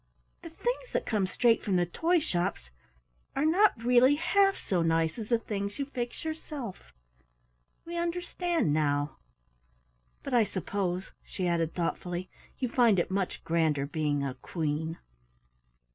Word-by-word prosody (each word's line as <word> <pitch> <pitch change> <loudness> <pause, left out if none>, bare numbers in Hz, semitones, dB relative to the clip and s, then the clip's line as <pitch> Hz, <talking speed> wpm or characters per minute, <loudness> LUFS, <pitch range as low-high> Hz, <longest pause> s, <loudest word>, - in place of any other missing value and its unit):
The 335 - -8
things - - -3
that - - 0
come 210 -5 +1
straight 230 +4 +3
from 200 -4 0
the 175 -1 +3
toy 330 - +1
shops 175 - -2 0.6
are 275 - +1
not 345 - +4
really 250 +3 +6
half 390 +5 +3
so 180 -3 0
nice 165 +3 +1
as 215 - -6
the 235 - +4
things 205 -2 -4
you 280 - -1
fix 245 +1 -5
yourself 300 - -6 0.9
we 340 +1 -6
understand 345 - 0
now. 145 -1 0 1.1
But - - -5
I 240 -2 +6
suppose," 190 -2 -2
she 185 - -3
added 165 -2 0
thoughtfully, 175 +1 -3 0.3
"you 255 - -1
find 235 -4 +4
it 175 - 0
much 190 -1 -2
grander 160 -4 +1
being 145 -1 -1
a 135 -2 -2
Queen?" 160 +2 -3
200 Hz, 145 wpm, -29 LUFS, -, 1.1 s, really